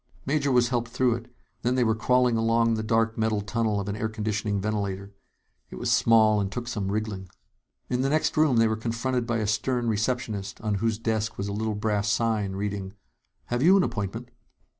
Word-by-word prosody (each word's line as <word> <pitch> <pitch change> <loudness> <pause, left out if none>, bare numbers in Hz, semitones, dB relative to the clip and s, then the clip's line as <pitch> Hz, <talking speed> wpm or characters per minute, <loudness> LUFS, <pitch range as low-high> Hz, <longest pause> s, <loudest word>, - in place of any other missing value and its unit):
Major 140 0 +1
was 120 -2 +3
helped 120 -2 -1
through 125 0 +2
it, 120 +1 -8 0.3
then 125 +1 +1
they 125 - +3
were 110 -1 +2
crawling 125 +2 +2
along 115 0 +2
the 110 - -1
dark 115 +1 +1
metal 110 -1 +1
tunnel 110 0 -1
of 100 - -4
an 100 - -2
air 110 0 -2
conditioning 105 -1 -2
ventilator. 100 -1 -3 0.6
It - - -9
was - - -2
small, 110 -2 +4
and 95 -1 -2
took 120 +2 -5
some 100 -5 -2
wriggling. 105 -3 -3 0.6
In 125 0 -1
the 135 - +1
next 155 +2 +1
room, 155 -5 +3
they 115 0 +5
were 110 - 0
confronted 115 +2 -2
by 120 -1 0
a 110 - -1
stern 120 +3 0
receptionist 110 -3 -2
on 105 -1 -1
whose 115 -2 +1
desk 110 -1 -2
was 100 - -3
a 100 - -3
little 110 +1 -2
brass 105 0 0
sign, 105 -3 0
reading: 100 -1 -4 0.6
"Have 120 - 0
you 185 +6 +6
an 190 - +4
appointment?" 110 - -4
110 Hz, 205 wpm, -26 LUFS, 105-120 Hz, 0.6 s, you